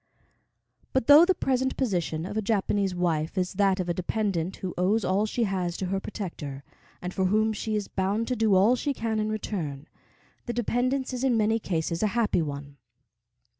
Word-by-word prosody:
But 260 -3 +1
though 295 +5 +9
the 375 0 +2
present 260 -3 0
position 175 - -1
of 195 - -6
a 220 - +1
Japanese 200 -2 0
wife 165 -1 -1
is 180 -1 0
that 195 -1 +2
of 180 - -2
a 175 - +1
dependent 185 -1 -1
who 185 -2 -5
owes 195 +3 +1
all 200 +4 +1
she 235 +2 -1
has 185 -4 -1
to 190 - -3
her 195 +1 -1
protector, 165 -10 -6 0.4
and 180 +1 -4
for 190 - 0
whom 215 +3 +2
she 215 +1 -3
is 210 -2 -2
bound 200 +4 -1
to 250 - +1
do 220 -4 +3
all 205 +7 +5
she 280 +2 -2
can 225 -2 -1
in 215 0 0
return, 165 -10 -4 0.6
the 240 - -2
dependence 255 +3 0
is 250 0 -3
in 255 -3 +3
many 220 +1 +2
cases 165 -4 -2
a 215 - +3
happy 220 -6 +2
one. 140 -2 -6
200 Hz, 195 wpm, -27 LUFS, 180-225 Hz, 0.6 s, though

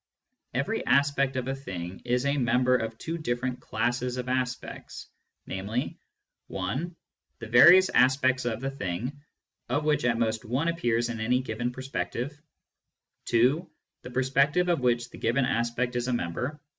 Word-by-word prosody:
Every - - -1
aspect 140 -1 +3
of 130 -1 -2
a 135 - 0
thing 95 -9 -7
is 125 +2 +1
a 140 +1 +2
member 125 0 +3
of 110 -2 -2
two 165 +6 -4
different 125 -3 -2
classes 120 +2 -1
of 125 0 -4
aspects, 125 0 -3 0.4
namely: 100 +6 -3 0.5
(i) 105 - -2 0.5
the - - -8
various 175 +11 +8
aspects 130 0 +3
of 115 -1 -2
the 135 0 -2
thing, 125 +4 -4 0.5
of 145 +4 0
which 150 -1 +2
at 120 -1 +2
most 110 -1 0
one 130 +9 0
appears 120 -8 0
in 115 -1 -4
any 120 +3 +2
given 120 0 -3
per 130 +1 -8
spective; 125 +3 -3 0.9
(2) 135 +9 +2 0.3
the - - -9
perspective 135 +7 +2
of 175 - +2
which 120 -1 0
the - - -11
given 125 +3 +1
aspect 120 0 -1
is 120 0 -1
a 125 - 0
member, 120 - -2
ue. 150 - -17
125 Hz, 160 wpm, -27 LUFS, 120-135 Hz, 0.9 s, various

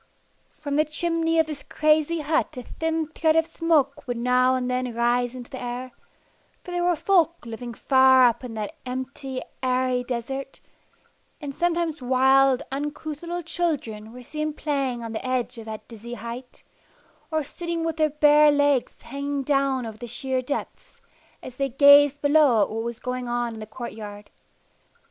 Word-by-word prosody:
From 290 -1 -4
the 305 - +5
chimney 330 +1 0
of 320 - +4
this 300 -2 -6
crazy 310 +1 +1
hut 305 -1 0
a 250 - -5
thin 320 +3 -2
thread 315 0 +1
of 325 0 +4
smoke 320 -5 0
would 245 -1 -2
now 250 +1 +3
and 255 -1 -1
then 250 -1 -2
rise 240 +1 +1
into 245 -1 -9
the 260 - -7
air, 250 +1 -5 0.7
for 360 - -8
there 350 0 -1
were 350 0 +3
folk 340 -3 +2
living 235 +1 -7
far 260 0 +5
up 240 +1 +2
in 240 -3 -7
that 210 -2 -4
empty, 260 +1 -5 0.2
airy 255 -1 +1
desert, 260 +3 -5 0.8
and 285 -2 -6
oftentimes 335 -2 -1
wild, 265 +1 +4
uncouth 295 +2 -4
little 345 0 -4
children 280 -11 -3
were 250 +1 -11
seen 305 +3 -3
playing 270 -6 -2
on 230 -1 -6
the 220 - -4
edge 255 -1 -2
of 225 - -9
the 220 -1 -6
dizzy 235 +1 -8
height, 235 +3 -8 0.7
or 315 -2 0
sitting 340 +3 -4
with 325 -1 -2
their 310 -1 +3
bare 300 0 +5
legs 285 -3 +1
hanging 280 0 -3
down 275 -2 +1
over 220 -1 -8
the 240 - -7
sheer 260 +2 -2
depths, 280 +3 -6 0.4
as 255 -1 -9
they 275 0 0
gazed 285 +2 +6
below 285 -7 +5
at - - -3
what 225 +1 -2
was 235 0 -5
going 250 -1 -4
on 240 -1 -1
in 220 - -9
the 215 - -8
court 235 +2 -7
yard. 205 -1 -10
265 Hz, 175 wpm, -24 LUFS, 245-305 Hz, 0.8 s, gazed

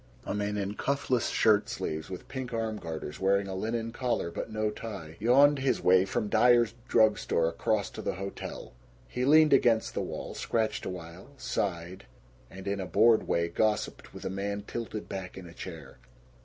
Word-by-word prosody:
A - - -2
man 105 0 -1
in 100 0 -2
cuffless 130 0 0
shirt 105 -2 +3
sleeves 80 0 -4
with 90 -1 -7
pink 130 -2 -5
arm 110 -1 -2
garters, 80 -4 -6
wearing 100 +1 +2
a 95 - -4
linen 115 +4 -2
collar 120 -8 -1
but - - -5
no 110 0 0
tie, 100 -8 -7
yawned 140 +6 +5
his 130 0 +1
way 95 +1 +5
from 100 +2 -1
Dyer's 120 +1 +4
Drug 110 -3 +4
Store 80 - +1
across 100 +5 -1
to - - -7
the - - -2
hotel. 100 +1 -7 0.3
He 125 0 -2
leaned 155 +1 +6
against 120 -4 +3
the - - -1
wall, - - -5
scratched 110 -1 -1
a - - -2
while, 90 +1 -8
sighed, 90 - -3 0.4
and 95 +1 -10
in 100 0 -1
a 95 - -4
bored 115 -1 +4
way 85 0 +1
gossiped 105 +5 -1
with - - -10
a - - -2
man 100 +1 -3
tilted 110 -1 -5
back 95 -1 -6
in 95 - -8
a 85 - -11
chair. 85 -2 -9
105 Hz, 185 wpm, -29 LUFS, 95-115 Hz, 0.4 s, leaned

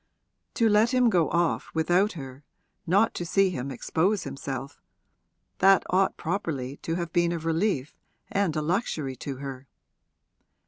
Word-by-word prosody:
To 230 - +3
let 220 +4 +3
him 250 -2 +4
go 175 -5 +2
off 170 -1 0
without 175 +6 +2
her, 135 -3 -9 0.4
not 200 +6 +3
to - - -4
see 190 +2 +2
him 135 -5 -4
expose 175 - 0
himself 135 0 -6 0.8
that 195 0 +6
ought 190 +1 +2
properly 150 -7 -3
to 165 - -3
have 170 -1 -4
been 170 -1 +2
a 170 - -1
relief 165 -2 -1 0.4
and 195 -5 +1
a 155 - -1
luxury 155 - -1
to 140 - -5
her. 135 0 -8
170 Hz, 145 wpm, -27 LUFS, 140-195 Hz, 0.8 s, that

